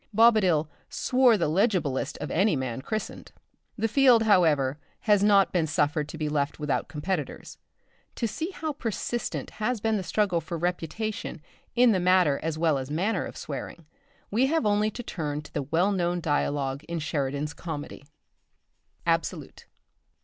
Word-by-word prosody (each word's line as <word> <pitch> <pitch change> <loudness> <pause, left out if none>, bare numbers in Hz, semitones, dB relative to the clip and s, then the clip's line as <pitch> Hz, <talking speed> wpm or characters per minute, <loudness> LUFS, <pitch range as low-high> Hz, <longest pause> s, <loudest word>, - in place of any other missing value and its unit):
Bobadil 200 -9 +5 0.2
"swore 250 -3 +3
the 170 - +1
legiblest 155 - 0
of - - -5
any 190 +1 +3
man 130 -2 -3
christened." 215 +8 -5 0.5
The 225 +1 +1
field, 245 -1 +5
however, 155 -9 +3 0.2
has 210 -2 +3
not 200 -2 +5
been 170 -3 +1
suffered 150 0 0
to - - -7
be 155 -1 -2
left 145 -1 -1
without 150 -2 -1
competitors. 150 +2 -4 0.6
To 230 - -1
see 320 - -4
how 315 -5 -4
persistent 240 -2 -3
has 245 +2 0
been 220 +1 +1
the 190 - -3
struggle 185 -3 +1
for 165 +2 -5
reputation 175 +4 -3 0.4
in 245 -1 +6
the 190 - +2
matter 180 -5 +3
as 160 -1 -2
well 160 -4 +2
as 130 +1 -6
manner 185 +6 0
of - - -9
swearing, 155 +3 -7 0.5
we 240 +6 +3
have 320 -3 +1
only 210 +1 +2
to 245 +3 -7
turn 150 -7 -4
to - - -15
the 145 - -1
well 165 +8 +1
known 175 -2 0
dialogue 145 -3 -1
in 170 - -4
Sheridan's 150 -1 -2
comedy: 150 -4 -7 1.0
"_Absolute. - - -2
175 Hz, 155 wpm, -27 LUFS, 150-215 Hz, 1.0 s, in